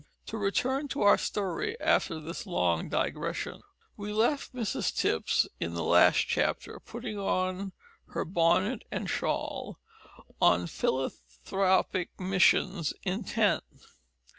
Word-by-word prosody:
To 220 Hz, -, -5 dB
return 260 Hz, +8 st, 0 dB
to 275 Hz, -, -2 dB
our 205 Hz, -, +6 dB
story 420 Hz, -, -2 dB
after 160 Hz, -, +2 dB
this 165 Hz, +6 st, -7 dB
long 90 Hz, -, 0 dB
digression: -, -, -2 dB, 0.3 s
We 210 Hz, 0 st, -5 dB
left 235 Hz, +7 st, +1 dB
Mrs 230 Hz, -5 st, -1 dB
Tipps 80 Hz, -, +2 dB
in 85 Hz, 0 st, -3 dB
the 85 Hz, -, -2 dB
last -, -, +5 dB
chapter -, -, -1 dB
putting 210 Hz, -, -6 dB
on 185 Hz, 0 st, -1 dB, 0.4 s
her -, -, -3 dB
bonnet 185 Hz, +7 st, +2 dB
and -, -, -3 dB
shawl, -, -, -2 dB, 0.6 s
on 90 Hz, 0 st, +5 dB
philanthropic 135 Hz, -, -1 dB
missions 185 Hz, -3 st, +2 dB
intent. 200 Hz, 0 st, +1 dB
190 Hz, 115 wpm, -29 LUFS, 165-210 Hz, 0.6 s, our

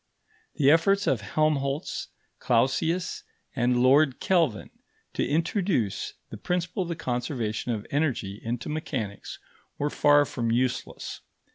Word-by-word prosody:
The 140 Hz, -3 st, +5 dB
efforts 195 Hz, +5 st, +3 dB
of 125 Hz, -5 st, +1 dB
Helmholtz, 140 Hz, +4 st, -1 dB, 0.3 s
Clausius, 160 Hz, +9 st, +1 dB, 0.3 s
and 125 Hz, -1 st, +2 dB
Lord 135 Hz, +1 st, +4 dB
Kelvin 165 Hz, -, +1 dB, 0.4 s
to -, -, 0 dB
introduce 160 Hz, -, 0 dB, 0.2 s
the -, -, -6 dB
principle 180 Hz, +1 st, -2 dB
of 175 Hz, -, -3 dB
the 170 Hz, -, -2 dB
conservation 120 Hz, -4 st, -2 dB
of 110 Hz, -2 st, -3 dB
energy 130 Hz, -9 st, -1 dB
into 115 Hz, +1 st, -3 dB
mechanics, 130 Hz, -9 st, -4 dB, 0.4 s
were 145 Hz, +1 st, -1 dB
far 145 Hz, 0 st, +5 dB
from 120 Hz, -4 st, -2 dB
useless. 125 Hz, +2 st, -2 dB
140 Hz, 120 wpm, -27 LUFS, 120-160 Hz, 0.4 s, The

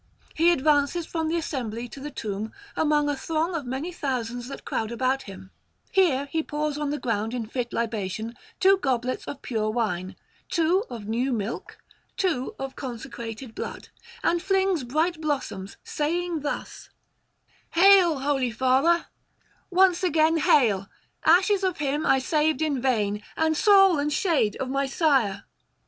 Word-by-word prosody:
He 335 Hz, +2 st, +4 dB
advances 300 Hz, +1 st, +2 dB
from 320 Hz, -1 st, -2 dB
the 330 Hz, +2 st, 0 dB
assembly 245 Hz, -7 st, -4 dB
to 275 Hz, -, -10 dB
the 295 Hz, +2 st, -6 dB
tomb 215 Hz, -5 st, -4 dB, 0.2 s
among 300 Hz, -1 st, +2 dB
a 290 Hz, -, 0 dB
throng 325 Hz, +5 st, -1 dB
of 300 Hz, -6 st, -3 dB
many 270 Hz, +8 st, -3 dB
thousands 245 Hz, -6 st, -3 dB
that 275 Hz, -, -9 dB
crowd 220 Hz, 0 st, -2 dB
about 260 Hz, +3 st, 0 dB
him; 190 Hz, -4 st, -11 dB, 0.4 s
here 320 Hz, -9 st, +3 dB
he 320 Hz, +3 st, -1 dB
pours 300 Hz, -1 st, -2 dB
on 295 Hz, -1 st, -2 dB
the 295 Hz, -, -1 dB
ground 225 Hz, -2 st, -2 dB
in 235 Hz, -2 st, -3 dB
fit 240 Hz, +1 st, -4 dB
libation 220 Hz, -1 st, -3 dB, 0.3 s
two 385 Hz, +1 st, +5 dB
goblets 255 Hz, -4 st, -1 dB
of 280 Hz, -, -7 dB
pure 220 Hz, -4 st, -1 dB
wine, 205 Hz, -5 st, -2 dB, 0.3 s
two 350 Hz, +5 st, +2 dB
of 225 Hz, -4 st, -7 dB
new 240 Hz, +5 st, -1 dB
milk, 220 Hz, -1 st, -4 dB, 0.4 s
two 320 Hz, -10 st, -1 dB
of 270 Hz, 0 st, -6 dB
consecrated 235 Hz, -2 st, -7 dB
blood, -, -, -6 dB, 0.3 s
and 345 Hz, 0 st, +2 dB
flings 385 Hz, -5 st, +1 dB
bright 315 Hz, +6 st, 0 dB
blossoms, 265 Hz, -11 st, -3 dB
saying 340 Hz, +2 st, -1 dB
thus: 290 Hz, 0 st, -5 dB, 0.8 s
'Hail, 350 Hz, -5 st, +6 dB
holy 270 Hz, -3 st, +1 dB
father, 260 Hz, +9 st, +2 dB, 0.6 s
once 370 Hz, -1 st, +4 dB
again; 325 Hz, -2 st, +3 dB
hail, 215 Hz, -11 st, +3 dB, 0.4 s
ashes 380 Hz, +4 st, +4 dB
of 370 Hz, -2 st, 0 dB
him 290 Hz, +1 st, -1 dB
I 270 Hz, -, +5 dB
saved 305 Hz, +1 st, +1 dB
in 285 Hz, -5 st, 0 dB
vain, 210 Hz, -5 st, 0 dB, 0.2 s
and 320 Hz, 0 st, +2 dB
soul 390 Hz, -3 st, +6 dB
and 295 Hz, +1 st, 0 dB
shade 295 Hz, -, +1 dB
of 265 Hz, -, -3 dB
my 275 Hz, +1 st, 0 dB
sire! 265 Hz, -, +1 dB
280 Hz, 155 wpm, -25 LUFS, 235-325 Hz, 0.8 s, Hail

